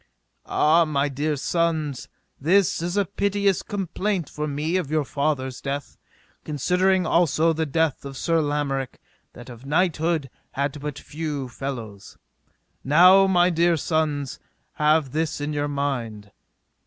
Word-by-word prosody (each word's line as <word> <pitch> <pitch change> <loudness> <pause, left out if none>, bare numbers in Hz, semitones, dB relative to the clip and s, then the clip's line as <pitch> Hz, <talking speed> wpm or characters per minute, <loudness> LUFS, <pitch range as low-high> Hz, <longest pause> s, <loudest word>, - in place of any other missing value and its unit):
Ah, 160 +3 +4
my 145 -3 0
dear 145 +3 -1
sons, 155 -2 -1 0.3
this 180 +4 +2
is 175 +3 -2
a 200 - +3
piteous 200 -1 0
complaint 195 -3 -2
for 150 0 -3
me 150 +4 -2
of 180 -7 -1
your 155 -1 0
father's 135 -3 -2
death, 140 0 -4 0.5
considering 180 +5 +1
also 165 0 +3
the 160 0 -2
death 160 0 0
of 135 -1 -8
Sir 165 +1 +1
Lamorak, 145 -3 -2 0.4
that 120 - -12
of 120 -1 -11
knighthood 160 -3 0 0.2
had 140 +1 -2
but 150 -1 -5
few 150 -3 -5
fellows. 115 -6 -7 0.7
Now, 180 +7 +6
my 180 -1 +3
dear 170 0 +2
sons, 150 -4 -1 0.3
have 150 -2 +2
this 155 +1 -2
in 145 +1 -3
your 145 0 -1
mind. 120 -8 -3
150 Hz, 135 wpm, -24 LUFS, 140-170 Hz, 0.7 s, Now